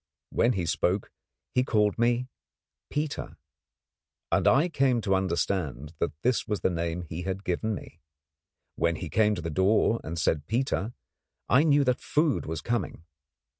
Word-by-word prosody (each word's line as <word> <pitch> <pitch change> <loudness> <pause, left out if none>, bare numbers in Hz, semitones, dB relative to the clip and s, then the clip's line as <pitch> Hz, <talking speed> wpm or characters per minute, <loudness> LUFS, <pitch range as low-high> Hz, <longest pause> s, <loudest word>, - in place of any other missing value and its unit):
Whenever 120 0 +2
he 90 -3 -1
spoke 90 +4 0 0.4
he 125 - +3
called 105 -3 +1
me 120 +1 +2 0.6
'Peter,' 150 0 -3 0.9
and - - +3
I 140 +7 +5
came 135 -7 +2
to 100 -2 +1
understand 85 -6 -1
that - - 0
this 125 0 +1
was 105 -3 -2
the - - +2
name 85 0 -2
he 85 +1 -6
had 95 +2 -4
given 105 +4 -1
me. - - -11 0.8
When 85 0 +1
he 80 +1 -5
came 105 -1 +3
to 85 - -6
the 80 - -3
door 105 +6 +3
and 85 +1 -5
said 75 -1 0
'Peter,' 120 -1 -1 0.5
I 125 - +5
knew 145 -2 +4
that 125 -1 +1
food 150 -2 +1
was 80 -1 -3
coming. 100 -7 -3
105 Hz, 160 wpm, -28 LUFS, 85-125 Hz, 0.9 s, I